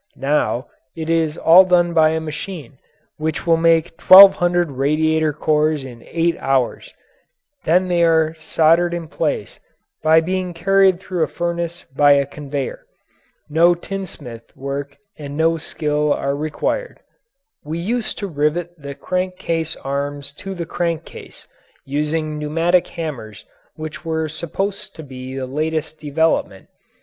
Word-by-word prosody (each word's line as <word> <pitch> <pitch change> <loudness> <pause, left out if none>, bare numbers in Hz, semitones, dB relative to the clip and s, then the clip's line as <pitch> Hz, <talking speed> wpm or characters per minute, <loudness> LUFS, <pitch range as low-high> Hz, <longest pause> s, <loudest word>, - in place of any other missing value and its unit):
Now 135 -2 0 0.3
it 160 0 -3
is 160 -2 0
all 170 +3 +7
done 175 -2 +2
by 160 -1 +5
a 160 0 -1
machine 155 -3 -7 0.4
which 155 0 -3
will 165 -1 +4
make 165 0 +2
twelve 195 +1 +10
hundred 175 -2 +1
radiator 155 +3 +1
cores 150 -1 0
in 120 -3 -11
eight 170 0 0
hours; 135 -3 -1 0.7
then 180 +3 +3
they 175 -1 +1
are 160 -1 +3
soldered 165 +2 +2
in 170 -2 -5
place - - -3 0.4
by 160 +1 +5
being 180 +1 -3
carried 195 +1 +3
through 185 -2 -4
a 160 - +2
furnace 170 0 -4
by 145 0 +6
a 140 0 +2
conveyor. 140 -1 -6 0.6
No 170 +3 +4
tinsmith 165 -11 -8
work 140 +1 -5 0.2
and 145 -1 -7
so - - -6
no 165 +1 +2
skill 150 -1 -1
are 140 0 0
required. 155 - -3 0.6
We 155 +2 -5
used 220 +7 -2
to 200 - -4
rivet 155 +2 -1
the 140 -1 -8
crank 185 +3 -3
case 165 -2 -2
arms 140 +1 -4
to 195 0 -6
the 170 -2 -4
crank 165 -1 -2
case, - - -13 0.4
using 150 +2 -2
pneumatic 165 +4 +1
hammers 135 -11 -7 0.3
which 155 0 -7
were 160 -1 -2
supposed 190 +6 -4
to 160 - -9
be 130 -1 -8
the 135 -1 -3
latest 155 +3 -3
development. 150 -9 -1
160 Hz, 145 wpm, -20 LUFS, 145-170 Hz, 0.7 s, twelve